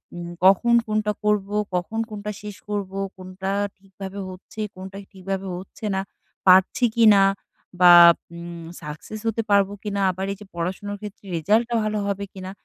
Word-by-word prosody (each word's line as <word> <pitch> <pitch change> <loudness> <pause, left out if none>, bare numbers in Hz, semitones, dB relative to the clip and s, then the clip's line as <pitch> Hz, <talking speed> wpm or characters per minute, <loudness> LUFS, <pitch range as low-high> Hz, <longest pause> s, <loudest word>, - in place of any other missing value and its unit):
উম 175 0 -6 0.2
কখন 195 +5 +5
কোনটা 215 0 0
করবো? 210 -1 +1 0.2
কখন 180 +6 -2
কোনটা 210 -1 -5
শেষ 210 -1 -7
করবো? 200 -2 -3 0.2
কোনটা 185 +1 -5 0.3
ঠিকভাবে 195 0 -9
হচ্ছে? 185 +3 -12 0.2
কোনটা 190 +1 -9 0.2
ঠিকভাবে 195 0 -4
হচ্ছে 190 +4 -9
না? 190 - 0 0.5
পারছি 185 +6 +6
কিনা 215 -4 +6 0.6
বা 180 -1 +9 0.4
উম 170 -1 -8 0.2
সাকসেস 150 +8 -8
হতে 225 0 0
পারবো 200 -1 +4
কিনা? 200 -2 -2
আবার 190 +1 -4
এইযে 205 +1 -12
পড়াশোনার 190 +4 -3
ক্ষেত্রে 210 -1 -9
রেজাল্টটা 220 +8 +1
ভালো 215 0 -1
হবে 200 0 -2
কিনা? 190 -1 -7
195 Hz, 145 wpm, -23 LUFS, 185-210 Hz, 0.6 s, বা